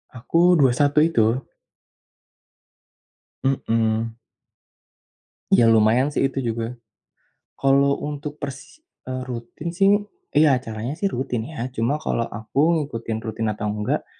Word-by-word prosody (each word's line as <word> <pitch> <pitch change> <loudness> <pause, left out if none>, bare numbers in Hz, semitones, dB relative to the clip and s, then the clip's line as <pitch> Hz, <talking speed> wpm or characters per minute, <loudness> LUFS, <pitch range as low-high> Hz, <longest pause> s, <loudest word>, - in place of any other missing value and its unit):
Aku 170 +8 +3
21 145 +3 +3
itu. 120 -5 +1 2.0
Mmm. 115 -3 0 1.3
Ya, 120 - +6
lumayan 115 +6 +4
sih 135 - +1
itu 135 0 -5
juga. 115 +1 -3 0.8
Kalau 140 +1 +3
untuk 145 0 -6
persi 145 - -8 0.3
eee, 130 0 -3
rutin 120 +6 -6
sih, 195 +2 +4 0.4
ya 150 -2 +5
acaranya 115 +1 -4
sih 195 +4 -1
rutin 120 -2 -2
ya. 140 -6 -4
Cuma 120 +7 0
kalau 120 - -1 0.2
aku 140 +10 +1
ngikutin 115 -7 -4
rutin 110 0 -2
atau 105 0 -4
enggak, 115 +8 -2
130 Hz, 115 wpm, -23 LUFS, 115-145 Hz, 2.0 s, Ya